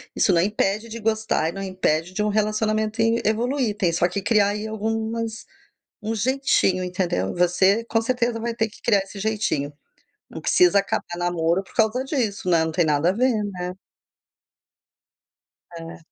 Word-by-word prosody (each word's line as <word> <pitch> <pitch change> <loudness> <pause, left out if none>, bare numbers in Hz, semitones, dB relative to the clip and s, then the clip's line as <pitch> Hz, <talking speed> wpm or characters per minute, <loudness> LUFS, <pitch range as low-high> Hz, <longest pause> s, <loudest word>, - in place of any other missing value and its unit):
isso 195 - +3
não 170 -1 +4
impede 210 +2 0
de 230 +1 -7
gostar 220 -7 0
e - - -4
não 195 +1 -6
impede 180 -2 -1
de 210 - -2
um 210 - +1
relacionamento 215 +1 0
in 225 +1 +2
evoluir, 235 +1 0
tem 180 -5 +1
só 175 +1 +2
que 195 +2 -4
criar 210 -1 +3
aí 210 +1 -3
algumas 220 +1 -3 0.6
um 220 +1 -2
jeitinho, 225 -5 +1
entendeu. 180 - -2
Você 190 +5 +3
com 225 -1 0
certeza 240 0 0
vai 235 0 -2
ter 225 -1 0
que - - -18
criar 205 -4 +4
esse 195 +1 -8
jeitinho. 200 -9 -1 0.6
Não - - -7
precisa 360 - +4
acabar 200 - -2
namoro 175 +1 0
por - - -20
causa 225 +4 +1
disso, 220 - -2
né, 165 -1 +4
não 160 0 -2
tem 170 +1 +2
nada 150 +2 +2
a - - +3
ver, 250 +5 +2 0.2
né. 180 0 -4 2.1
É. 165 +1 -9
210 Hz, 170 wpm, -23 LUFS, 180-225 Hz, 2.1 s, não